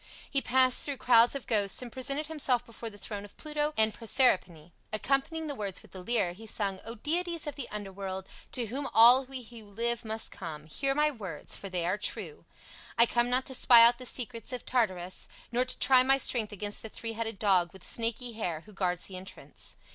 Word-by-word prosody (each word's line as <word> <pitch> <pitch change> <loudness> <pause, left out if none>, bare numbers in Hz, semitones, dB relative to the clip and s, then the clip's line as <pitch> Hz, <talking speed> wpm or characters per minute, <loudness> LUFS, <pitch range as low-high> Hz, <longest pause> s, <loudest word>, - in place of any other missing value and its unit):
He 275 - +2
passed 255 0 +3
through 285 -2 -3
crowds 240 +1 +5
of 275 - -5
ghosts 205 -4 +1
and 250 -2 -5
presented 275 +4 -1
himself 270 -6 0
before 230 0 -8
the 205 - -14
throne 205 0 -6
of 205 - -14
Pluto 300 -1 -2
and 220 -1 +3
Proserpine. 185 - +2 0.2
Accompanying 275 +8 -1
the 295 - -4
words 200 -7 -5
with - - -18
the 185 - -9
lyre, 205 -5 +1
he 220 +5 -12
sung, 200 -3 -2
"O 230 +1 -7
deities 335 +6 -2
of 295 - -4
the 275 -3 -7
underworld, 195 -2 -6 0.3
to 245 -3 0
whom 270 +6 -4
all 245 +4 +8
we 260 -1 -8
who 230 -1 -11
live 230 +3 -2
must 220 0 -2
come, 155 -4 -8
hear 270 - -1
my 300 +1 +2
words, 195 - -6
for 195 - -8
they 180 -2 -2
are 185 +4 0
true. 445 - -4 0.5
I 235 - +8
come 240 +1 +1
not 255 +1 +2
to 265 - -4
spy 240 -2 +8
out 240 +1 +4
the 255 - -2
secrets 235 -2 -2
of 250 -2 -6
Tartarus, 185 -8 -1 0.2
nor 245 +1 +1
to 255 - 0
try 260 -1 +6
my 270 +1 +4
strength 235 -5 0
against 205 0 -3
the 220 - -8
three 225 +1 -5
headed 225 -1 -4
dog 185 -5 +2
with 190 - -14
snaky 235 +1 -1
hair 175 -8 -4
who 210 +4 -17
guards 180 -2 -1
the 185 - -7
entrance. 190 +1 -8
230 Hz, 215 wpm, -29 LUFS, 200-255 Hz, 0.5 s, all